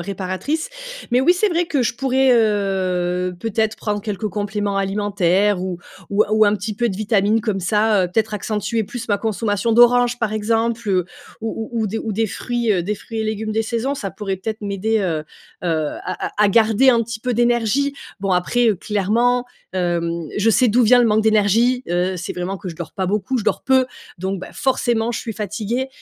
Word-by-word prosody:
réparatrices. 195 - -3 0.4
Mais 250 - +4
oui, 295 +7 +5
c'est 385 +4 +1
vrai 345 0 0
que 295 -5 0
je 235 - 0
pourrais 265 +1 +2
heu, 185 -5 +1
peut-être 220 +1 -1
prendre 210 -1 -2
quelques 210 0 -3
compléments 205 0 -2
alimentaires 195 -1 +1
ou 185 -2 -4 0.3
ou 200 +1 +3
ou 215 0 +5
un 205 0 +3
petit 210 +1 -4
peu 240 +3 0
de 190 - -4
vitamines 215 +1 +2
comme 210 -3 -2
ça, 210 0 +2
heu. - - -10
Peut-être 220 -1 0
accentuer 215 +2 -2
plus 230 +3 -6
ma 205 -1 +2
consommation 215 +1 -1
d'oranges 240 +1 +5
par 230 -3 -1
exemple, 225 +1 0
heu, 185 -2 +2 0.4
ou 225 0 -4
ou 230 -1 -1
ou 215 - 0
des 220 +3 -3
ou 220 - -3
des 225 +2 0
fruits, 235 +2 -1
heu, 180 -3 +1
des 210 +4 -2
fruits 225 +2 -7
et 220 - -1
légumes 215 0 -2
des 225 +1 +1
saisons. 235 +5 -2
Ça 205 -9 -4
pourrait 195 +1 -4
peut-être 215 +3 -5
m'aider, 205 +2 0
heu, 175 -6 0 0.4
heu, 160 -3 0 0.2
à 185 - -3
à - - -6
à 205 - +4
garder 225 +4 +4
un 235 -2 +3
petit 225 0 -6
peu 250 +1 -1
d'énergie. 240 +4 +1 0.2
Bon, 195 -1 -1
après, 210 +7 +2
heu, 210 - +1
clairement, 225 +6 +1 0.3
hem, 170 -2 -1
je 215 +2 +3
sais 250 +3 +4
d'où 240 +2 +3
vient 245 +2 +6
le 240 - +4
manque 215 0 +3
d'énergie. 220 +4 +3
Heu, 180 +2 0
c'est 175 - -5
vraiment 180 +2 -3
que 190 - -7
je 170 - -6
dors 170 0 -7
pas 190 - -2
beaucoup. 210 +6 -1
Je 215 - -4
dors 215 - +1
peu, 260 0 +4 0.3
donc 190 +1 -3
bah - - -8
forcément 240 -3 0
je - - -2
suis 225 - -5
fatiguée. 215 +5 -3
215 Hz, 210 wpm, -20 LUFS, 195-235 Hz, 0.4 s, vient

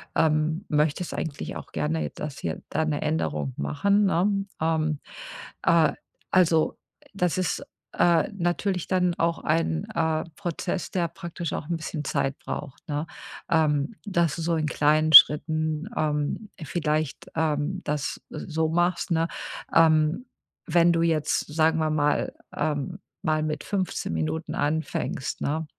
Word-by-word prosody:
ähm, 155 +2 +2
möchtest 150 +3 +1
eigentlich 150 -3 -4
auch - - -11
gerne 75 +1 -1
j 75 - -4
das 145 -2 -6
hier 80 -2 -4
da 160 - 0
'ne 150 -2 -1
Änderung 75 - -1
machen, 200 - +2
ne? 195 +2 +1 0.2
Ähm. 155 -2 +1 0.6
Äh, 165 -2 +4 0.4
also, 165 -4 +3 0.4
das 180 -2 0
ist, 185 - -1 0.3
äh, 170 -1 +4
natürlich 180 0 -1
dann 180 -2 +2
auch 170 0 +2
ein, 155 - +1
äh, 160 -1 +1
Prozess, 180 0 -3
der 175 -2 0
praktisch 170 0 -6
auch 150 - -4
'n 170 - 0
bisschen 155 -1 -5
Zeit 135 0 -1
braucht, 135 - -7
ne? 145 +1 -1 0.5
Ähm, 155 +3 +2
dass 170 -7 +1
du 170 - -5
so 165 +1 +1
in 155 -1 0
kleinen 155 +1 +2
Schritten, 155 +3 +7
ähm, 150 +7 -1
vielleicht, 155 -1 -2
ähm, 160 +3 0
das 145 -3 -2
s - - -6
so 160 0 +1
machst, 175 +2 +1
ne? 165 0 +2 0.5
Ähm, 160 +6 +4 0.4
wenn 170 0 +4
du 165 0 +2
jetzt, 155 -3 +1
sagen 160 +1 +3
wir 155 -1 +1
mal 150 -1 +1 0.2
ähm, 145 -3 -2 0.3
mal 155 0 +2
mit 155 -1 -3
15 190 - -2
Minuten 80 - -2
anfängst, 150 -3 -2
ne, 160 +3 -1
160 Hz, 145 wpm, -26 LUFS, 150-170 Hz, 0.6 s, Schritten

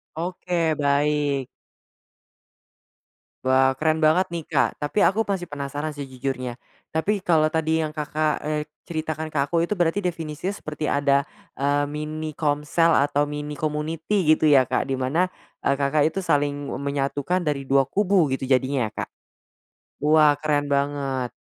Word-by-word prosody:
Oke, 170 -1 -1
baik. 145 -1 +1 2.0
Wah, 130 0 +3
keren 155 +2 +1
banget 160 +4 +4
nih, 170 -2 -3
Kak. - - +3
Tapi 145 +8 -1
aku 205 +4 +3
masih 195 -5 -2
penasaran 145 0 -4
sejujurnya, 130 -3 -4 0.3
tapi 195 +6 0
kalau 160 -4 +3
tadi 160 0 +1
yang 150 - -6
Kakak, 150 0 -1
eee, 150 0 -2 0.2
ceritakan 155 -1 -4
ke 155 - -5
aku 165 +3 0
itu 195 +4 -1
berarti 175 +3 +1
definisinya 170 -1 -3
seperti 155 0 -4
ada, 140 -1 +3 0.3
eee, 145 +1 +1
mini 155 +1 -5
komsel 150 +2 +1
atau 145 +1 +1
mini 150 0 -5
community 155 +4 0
gitu 155 -1 +2
ya, 135 -3 +6
Kak? 130 - -1
Di 135 - 0
mana 160 +8 +1 0.3
e - - 0
Kakak 145 +2 +2
itu 175 - -10
saling 145 -1 0
e - - -3
menyatukan 140 +5 -1
dari 145 -2 0
2 135 0 +4
kubu 195 +2 +2
gitu 130 0 -3
jadinya 130 -3 +2
ya, - - -28
Kak? - - -36 0.9
Wah, 150 -1 +5
keren 145 -1 0
banget. 140 -3 -1
150 Hz, 150 wpm, -24 LUFS, 140-160 Hz, 2.0 s, ya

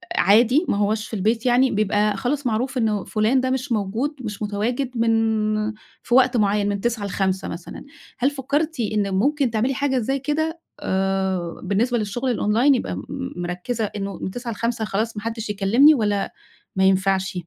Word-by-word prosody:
عادي، 240 - +4
ما - - +1
هواش 210 +1 0
في - - -14
البيت، 220 +5 0
يعني 250 +2 +4
بيبقى 210 0 +1
خلاص 270 +5 -2
معروف 250 +4 -1
إنه 215 -5 0
فلان 225 +5 +1
ده 260 - -1
مش 260 0 -2
موجود، 225 +8 -1
مش 210 -4 -6
متواجد 240 +5 -2
من 230 0 +3 0.9
في - - -3
وقت 255 -2 +5
معين 205 -1 +2
من 200 -1 -2
9 230 -3 -1
ل5 190 -1 -1
مثلًا. 170 +1 -8 0.3
هل 265 +3 +3
فكّرتِ 290 +2 -2
إن 210 -3 0
ممكن 270 +5 +1
تعملي 235 +5 0
حاجة 270 0 0
زي 270 +3 0
كده 315 +4 -2 0.2
آآ 190 -2 -1
بالنسبة 240 +5 +1
للشغل 240 +4 -1
الOnline 235 +7 +3
يبقي 165 - -3
م 95 - -6 0.3
مركِّزة 180 +7 -3
إنه 200 -1 -5
من 185 - -3
9 245 +1 -5
ل5 230 0 -2
خلاص، 220 +2 -2
ما 210 - -5
حدّش 225 -1 -4
يكلّمني، 215 +10 +5
والّا 205 -5 0 0.4
ما 190 - +2
ينفعش؟ 190 0 +2
220 Hz, 170 wpm, -22 LUFS, 200-255 Hz, 0.9 s, وقت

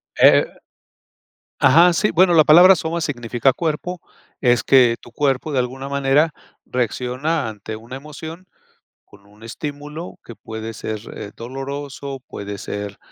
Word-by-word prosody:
Eh - - +7
eh. - - +3 1.1
Ajá. 170 +5 +6
Sí, 210 +6 +1
bueno, 180 +1 +4
la 155 -2 +7
palabra 180 +5 +8
"soma" 165 +1 -3
significa 120 -3 0
"cuerpo", 170 +2 -3 0.4
es 120 -4 +3
que 125 -3 +5
tu 120 - -15
cuerpo 140 +3 -1
de 130 - +1
alguna 130 +2 -3
manera 140 +3 +2 0.3
reacciona 125 +4 -2
ante 110 0 -7
una 115 +4 -10
emoción 160 +5 -9 0.6
con 100 0 -20
un 105 +2 -21
estímulo 150 +7 -7
que 120 - -11
puede 110 0 -7
ser, 110 0 -5 0.2
eh, 100 - -7
doloroso, 135 +2 -6
puede 100 0 -7
ser, 100 0 -6
135 Hz, 140 wpm, -20 LUFS, 115-155 Hz, 1.1 s, palabra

